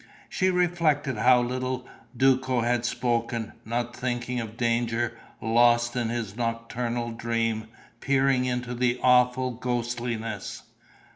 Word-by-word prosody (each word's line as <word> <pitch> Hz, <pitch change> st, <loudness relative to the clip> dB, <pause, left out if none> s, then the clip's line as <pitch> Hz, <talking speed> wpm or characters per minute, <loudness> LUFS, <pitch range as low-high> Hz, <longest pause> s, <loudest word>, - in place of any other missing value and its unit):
She 185 Hz, -1 st, +1 dB
reflected 165 Hz, -7 st, +1 dB
how 125 Hz, +3 st, +5 dB
little 130 Hz, +1 st, -3 dB, 0.3 s
Duco 130 Hz, -1 st, +3 dB
had 120 Hz, 0 st, +1 dB
spoken, 120 Hz, -2 st, -1 dB
not 120 Hz, +1 st, -2 dB
thinking 125 Hz, 0 st, -2 dB
of 115 Hz, -1 st, -6 dB
danger, 120 Hz, 0 st, 0 dB, 0.2 s
lost 120 Hz, +1 st, +3 dB
in 120 Hz, -2 st, 0 dB
his 115 Hz, -4 st, -3 dB
nocturnal 115 Hz, 0 st, -2 dB
dream, 115 Hz, -1 st, -1 dB, 0.3 s
peering 135 Hz, -1 st, +2 dB
into 125 Hz, -1 st, -2 dB
the 125 Hz, 0 st, 0 dB
awful 125 Hz, 0 st, +4 dB
ghostliness. 120 Hz, -3 st, -3 dB
120 Hz, 115 wpm, -26 LUFS, 115-125 Hz, 0.3 s, how